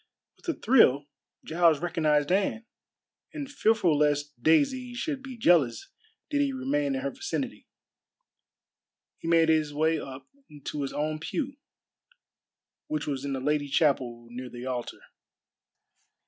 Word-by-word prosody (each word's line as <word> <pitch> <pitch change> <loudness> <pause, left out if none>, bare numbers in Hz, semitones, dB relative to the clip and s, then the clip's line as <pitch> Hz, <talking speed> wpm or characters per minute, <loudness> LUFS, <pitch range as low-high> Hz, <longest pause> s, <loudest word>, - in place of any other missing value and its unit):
With - - -19
a 335 - 0
thrill 145 - +5 0.4
Giles 165 -1 +3
recognized 155 -2 +1
Anne, 205 +4 +1 0.7
and 295 -3 -5
fearful 220 - +2
lest 145 -1 +1
Daisy 245 - +2
should 275 +2 -3
be 265 -2 -9
jealous 155 - +3 0.4
did 285 -1 +2
he 280 -1 +1
remain 275 +2 -1
in 265 - -2
her 280 0 -2
vicinity, 395 +10 -4 1.5
he - - -7
made 165 -1 +4
his 155 -2 +2
way 160 +1 +2
up 135 -1 -8 0.4
to 150 - -4
his 135 - -3
own 155 +1 -2
pew, 275 - -3 1.3
which 155 -1 -2
was 140 -2 -3
in 140 -1 -2
the 135 - -2
lady 145 +2 0
chapel 130 -5 +1
near 125 +1 -7
the 120 +1 -8
altar. 125 -2 -4
160 Hz, 135 wpm, -28 LUFS, -, 1.5 s, thrill